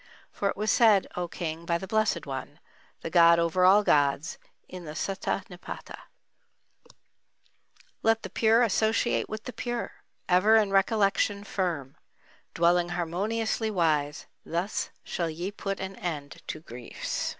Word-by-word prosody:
For 200 Hz, -, -1 dB
it -, -, -4 dB
was 210 Hz, 0 st, +1 dB
said, 215 Hz, -5 st, +5 dB
O 180 Hz, 0 st, -2 dB
King, 165 Hz, -1 st, -5 dB
by 170 Hz, 0 st, 0 dB
the 190 Hz, -, -7 dB
Blessed 215 Hz, -5 st, 0 dB
one, 140 Hz, +1 st, -6 dB, 0.4 s
the 165 Hz, -, -5 dB
god 170 Hz, 0 st, +7 dB
over 170 Hz, +2 st, +1 dB
all 200 Hz, +3 st, +6 dB
gods, 145 Hz, 0 st, +2 dB, 0.3 s
in 185 Hz, -1 st, -9 dB
the 155 Hz, -1 st, -8 dB
Sutta 195 Hz, +2 st, -2 dB
Nipâta: 180 Hz, 0 st, -9 dB, 2.1 s
Let 225 Hz, 0 st, +2 dB
the -, -, -7 dB
pure 225 Hz, +2 st, +4 dB
associate 220 Hz, +2 st, +1 dB
with 215 Hz, 0 st, -5 dB
the 250 Hz, -, -7 dB
pure, 240 Hz, +1 st, -3 dB, 0.4 s
Ever 185 Hz, +5 st, +5 dB
in 210 Hz, -3 st, +3 dB
recollection 200 Hz, 0 st, +2 dB
firm; 170 Hz, -10 st, -3 dB, 0.6 s
Dwelling 175 Hz, +1 st, +3 dB
harmoniously 205 Hz, +6 st, -1 dB
wise, 155 Hz, -6 st, 0 dB, 0.2 s
Thus 175 Hz, +5 st, -2 dB
shall 170 Hz, -2 st, -2 dB
ye 175 Hz, +5 st, -4 dB
put 195 Hz, -1 st, -4 dB
an 190 Hz, 0 st, -5 dB
end 150 Hz, -5 st, -5 dB
to 155 Hz, -, -5 dB
griefs. 120 Hz, -5 st, -5 dB
185 Hz, 140 wpm, -28 LUFS, 165-210 Hz, 2.1 s, god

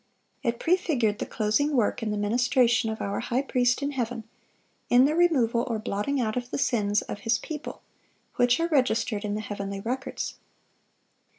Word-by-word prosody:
It 235 Hz, -3 st, -1 dB
prefigured 290 Hz, -, +1 dB
the -, -, -3 dB
closing 235 Hz, +7 st, +1 dB
work 240 Hz, -1 st, +1 dB
in 225 Hz, -, -2 dB
the 210 Hz, -, -1 dB
ministration 240 Hz, +2 st, +2 dB
of 220 Hz, -, -4 dB
our 200 Hz, 0 st, -2 dB
High 245 Hz, +3 st, -1 dB
Priest 250 Hz, 0 st, +1 dB
in 285 Hz, -, -1 dB
heaven, 245 Hz, -3 st, -3 dB, 0.7 s
in 250 Hz, +2 st, +6 dB
the 295 Hz, -, +2 dB
removal 265 Hz, -9 st, +3 dB
or 230 Hz, -3 st, -1 dB
blotting 215 Hz, +6 st, -2 dB
out 220 Hz, -3 st, -1 dB
of 245 Hz, -1 st, -3 dB
the -, -, -3 dB
sins 210 Hz, -6 st, +1 dB
of -, -, -6 dB
His 225 Hz, +2 st, +1 dB
people, 300 Hz, +5 st, -7 dB, 0.5 s
which 245 Hz, +2 st, +3 dB
are 335 Hz, -, +1 dB
registered 235 Hz, -8 st, +1 dB
in 205 Hz, -1 st, -2 dB
the 215 Hz, -, -3 dB
heavenly 200 Hz, -1 st, -5 dB
records. 250 Hz, +6 st, -4 dB
240 Hz, 175 wpm, -26 LUFS, 215-265 Hz, 0.7 s, in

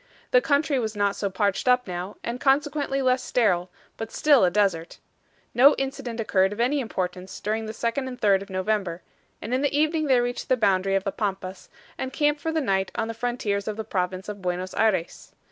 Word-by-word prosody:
The -, -, +6 dB
country 285 Hz, -, +1 dB
was 220 Hz, -2 st, -3 dB
not 200 Hz, -1 st, +1 dB
so 200 Hz, -, -2 dB
parched 200 Hz, +4 st, -1 dB
up 250 Hz, 0 st, +4 dB
now, 180 Hz, +3 st, -5 dB
and 240 Hz, +2 st, -4 dB
consequently 280 Hz, 0 st, +1 dB
less 255 Hz, 0 st, +2 dB
sterile, 185 Hz, -9 st, +1 dB, 0.3 s
but 225 Hz, 0 st, -6 dB
still 290 Hz, -6 st, +4 dB
a 180 Hz, -, +5 dB
desert. 175 Hz, -4 st, 0 dB, 0.6 s
No 275 Hz, +4 st, +7 dB
incident 265 Hz, -3 st, -4 dB
occurred 195 Hz, -3 st, +2 dB
of 205 Hz, -, -7 dB
any 260 Hz, +5 st, +2 dB
importance 185 Hz, -6 st, -4 dB
during 220 Hz, +2 st, -2 dB
the -, -, -4 dB
2d 235 Hz, +4 st, -2 dB
and 250 Hz, -1 st, -7 dB
3d 200 Hz, -3 st, +3 dB
of 200 Hz, -, -9 dB
November, 185 Hz, -2 st, -2 dB, 0.4 s
and 230 Hz, -, -4 dB
in 255 Hz, -, +1 dB
the 285 Hz, 0 st, +1 dB
evening 310 Hz, 0 st, +1 dB
they 260 Hz, -3 st, +4 dB
reached 245 Hz, +1 st, -3 dB
the 255 Hz, -, +3 dB
boundary 195 Hz, -3 st, +2 dB
of 195 Hz, -, +1 dB
the 195 Hz, -, -2 dB
Pampas, 195 Hz, -3 st, -4 dB, 0.3 s
and 260 Hz, -, -3 dB
camped 295 Hz, 0 st, +1 dB
for 320 Hz, -, -1 dB
the 320 Hz, 0 st, 0 dB
night 195 Hz, -6 st, 0 dB
on 225 Hz, 0 st, -2 dB
the -, -, -3 dB
frontiers 225 Hz, -4 st, -2 dB
of 215 Hz, -1 st, -3 dB
the 220 Hz, -, -3 dB
province 185 Hz, -2 st, -3 dB
of 205 Hz, -1 st, -6 dB
Buenos 180 Hz, 0 st, -3 dB
Ayres. 195 Hz, -6 st, -1 dB
220 Hz, 210 wpm, -25 LUFS, 195-260 Hz, 0.6 s, No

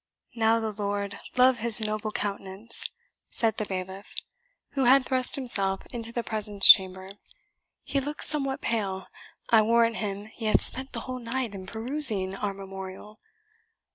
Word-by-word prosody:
"Now 225 Hz, 0 st, +2 dB
the 220 Hz, -1 st, -3 dB
Lord 200 Hz, -1 st, -4 dB, 0.2 s
love 255 Hz, -1 st, +4 dB
his 230 Hz, 0 st, +5 dB
noble 215 Hz, 0 st, -3 dB
countenance!" 200 Hz, +1 st, -4 dB, 0.4 s
said 225 Hz, -2 st, 0 dB
the 215 Hz, -, -3 dB
bailiff, 190 Hz, +1 st, -7 dB, 0.6 s
who 270 Hz, -2 st, -1 dB
had 260 Hz, +1 st, +5 dB
thrust 255 Hz, -1 st, -1 dB
himself 195 Hz, -8 st, 0 dB
into 230 Hz, -1 st, -5 dB
the 235 Hz, 0 st, -3 dB
presence 210 Hz, -3 st, +7 dB
chamber; 190 Hz, 0 st, +1 dB, 0.7 s
"he 280 Hz, -, -2 dB
looks 290 Hz, +2 st, +2 dB
somewhat 275 Hz, -3 st, 0 dB
pale. 195 Hz, -5 st, -3 dB, 0.5 s
I 225 Hz, -2 st, +6 dB
warrant 230 Hz, +1 st, +2 dB
him 205 Hz, -1 st, -5 dB
he 220 Hz, +1 st, -10 dB
hath 215 Hz, -, +2 dB
spent 265 Hz, +1 st, +2 dB
the -, -, -5 dB
whole 255 Hz, -1 st, -6 dB
night 240 Hz, -1 st, -4 dB
in 190 Hz, -1 st, -9 dB
perusing 220 Hz, -4 st, +2 dB
our 200 Hz, 0 st, -4 dB
memorial. 195 Hz, +2 st, -10 dB
220 Hz, 150 wpm, -26 LUFS, 195-240 Hz, 0.7 s, presence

